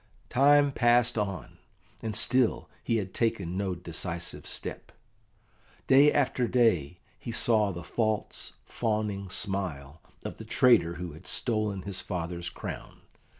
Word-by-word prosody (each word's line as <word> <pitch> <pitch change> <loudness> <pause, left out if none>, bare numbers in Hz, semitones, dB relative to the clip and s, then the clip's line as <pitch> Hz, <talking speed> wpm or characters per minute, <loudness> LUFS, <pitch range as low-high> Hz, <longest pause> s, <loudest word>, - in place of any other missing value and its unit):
Time 145 +2 +5
passed 120 -1 +3
on, 100 - -4 0.4
and 110 -2 -4
still 125 +2 +2 0.2
he 115 - 0
had 95 -4 -2
taken 95 -7 -1
no 95 -1 -1
decisive 85 0 -4
step. - - -5 0.9
Day 140 +3 +6
after 130 -3 +1
day 90 - +2 0.2
he 115 - -6
saw 110 -3 +2
the 85 -1 -7
false, 110 +4 -2
fawning 105 -4 -2
smile 85 -7 -3 0.2
of - - -5
the - - -8
traitor 110 -9 +4
who 90 0 -6
had 80 +5 -13
stolen 110 -5 -1
his 95 -1 -2
father's 85 -2 -4
crown. - - -8
100 Hz, 130 wpm, -28 LUFS, 90-120 Hz, 0.9 s, Day